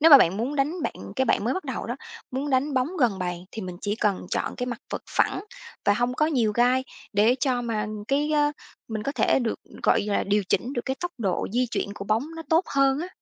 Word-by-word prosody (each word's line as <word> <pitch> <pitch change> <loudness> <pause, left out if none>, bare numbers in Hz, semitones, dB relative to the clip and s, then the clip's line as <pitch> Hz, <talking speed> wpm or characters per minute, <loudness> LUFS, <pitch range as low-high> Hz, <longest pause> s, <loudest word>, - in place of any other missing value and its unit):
nếu 325 +2 +7
mà 280 - +12
bạn 175 -2 +3
muốn 255 +7 -2
đánh 305 +5 0
bạn - - -1 0.2
cái 265 - +3
bạn 225 - +2
mới 250 - +1
bắt 375 - -3
đầu - - -4
đó, - - -3 0.3
muốn 275 +3 -2
đánh 275 +2 +2
bóng 255 +3 +2
gần 225 -7 +3
bàn 180 -1 -3
thì 220 - -6
mình 180 -1 -6
chỉ 205 +1 -1
cần 200 -4 0
chọn - - -1
cái 250 - -2
mặt 245 +1 -4
vợt - - -3
phẳng 385 - +1 0.4
và 205 - +4
hông 245 +2 0
có 305 +4 +2
nhiều 240 -9 +2
gai, 250 +3 +3 0.3
để 215 +5 +4
cho 250 -3 +1
mà 220 -3 -1 0.2
cái 290 +2 +2
á 295 0 +3 0.4
mình 215 -1 -3
có 280 - -2
thể - - +3
được, 235 -3 -1 0.2
gọi - - +4
là, 205 -1 0
điều 205 +1 +2
chỉnh 255 +3 +1
được 240 - -2
cái 265 0 -2
tốc 355 0 -2
độ 195 -5 0
di 250 +1 +2
chuyển - - -1
của 200 - -6
bóng 220 +7 +1
nó 325 - -5
tốt 325 +3 +4
hơn 275 0 +4
á. 355 - -4
250 Hz, 255 wpm, -26 LUFS, 210-280 Hz, 0.4 s, mà